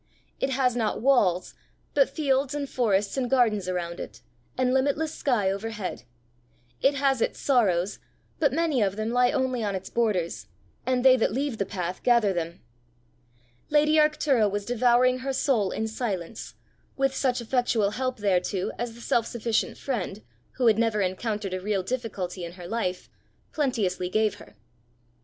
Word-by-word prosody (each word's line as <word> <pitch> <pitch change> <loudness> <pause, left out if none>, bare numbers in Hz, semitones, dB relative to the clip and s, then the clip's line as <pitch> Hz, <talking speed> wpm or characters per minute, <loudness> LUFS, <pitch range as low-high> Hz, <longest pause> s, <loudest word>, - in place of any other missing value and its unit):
It 270 - 0
has 255 -2 +1
not 225 -3 0
walls, 210 -9 +2 0.4
but 275 -2 +4
fields 275 -1 0
and 285 -1 -2
forests 210 -4 0
and 250 -2 0
gardens 220 -7 +2
around 175 -1 -3
it, 115 +2 -8 0.4
and 255 0 +2
limitless 285 +4 +1
sky 215 -8 +1
overhead. 200 - -5 0.8
It 275 +1 +3
has 270 -3 +1
its - - 0
sorrows, 205 -8 +1 0.4
but 290 -3 +3
many 310 -3 +1
of 195 -1 +1
them 215 +2 -2
lie 245 0 +4
only 255 -3 0
on 200 -2 -1
its 190 0 -6
borders, 210 -8 -1 0.4
and 255 0 +1
they 260 -1 +8
that 225 - +1
leave 270 -2 -2
the 200 - -1
path 180 -2 -4
gather 235 -5 +3
them. 170 0 -4 1.1
Lady 300 +1 +4
Arctura 300 -7 +3
was 205 0 -3
devouring 245 +2 +3
her 270 +1 -3
soul 255 -7 +1
in 220 - -2
silence, 220 -4 -4 0.4
with 270 -1 +1
such 255 -2 +1
effectual 235 -3 +1
help 255 +3 -2
thereto 190 -1 0
as 235 -1 -3
the 235 - -12
self 230 -1 +1
sufficient 230 -1 -1
friend, 215 -5 -4 0.3
who 255 - -1
had 225 -2 +5
never 225 -2 +1
encountered 200 +1 -2
a 185 - -3
real 200 -1 -1
difficulty 195 -6 -4
in 170 0 -6
her 180 -1 -10
life, 185 -4 -2 0.4
plenteously 210 -11 -1
gave 215 +1 +2
her. - - -15
230 Hz, 160 wpm, -26 LUFS, 195-260 Hz, 1.1 s, they